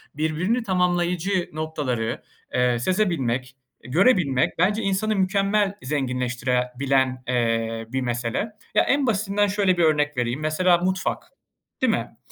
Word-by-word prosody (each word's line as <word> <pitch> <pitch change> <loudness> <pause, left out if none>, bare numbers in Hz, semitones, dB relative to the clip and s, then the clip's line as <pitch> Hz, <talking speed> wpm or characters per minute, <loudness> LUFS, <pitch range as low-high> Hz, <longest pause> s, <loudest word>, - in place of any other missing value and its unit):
birbirini 165 - 0
tamamlayıcı 180 -1 0
noktaları, 145 -8 -3 0.3
eee, 125 -1 +2
sezebilmek, 135 - 0 0.3
görebilmek 160 - +2
bence 205 +5 +2
insanı 195 +2 0
mükemmel 195 +1 +1
zenginleştire 125 -2 -1
bilen, 130 -2 +1
eee, 115 -2 0
bir 130 +2 -2
mesele. 120 - -2 0.2
Ya, - - +5
en 280 -1 +1
basitinden 205 -1 +1
şöyle 195 -2 +1
bir 175 - +3
örnek 150 -3 +2
vereyim, 120 +2 -1
mesela 175 +3 +3
mutfak, 185 +2 -1 0.6
değil - - +3
mi? - - -4
155 Hz, 120 wpm, -23 LUFS, 125-190 Hz, 0.6 s, Ya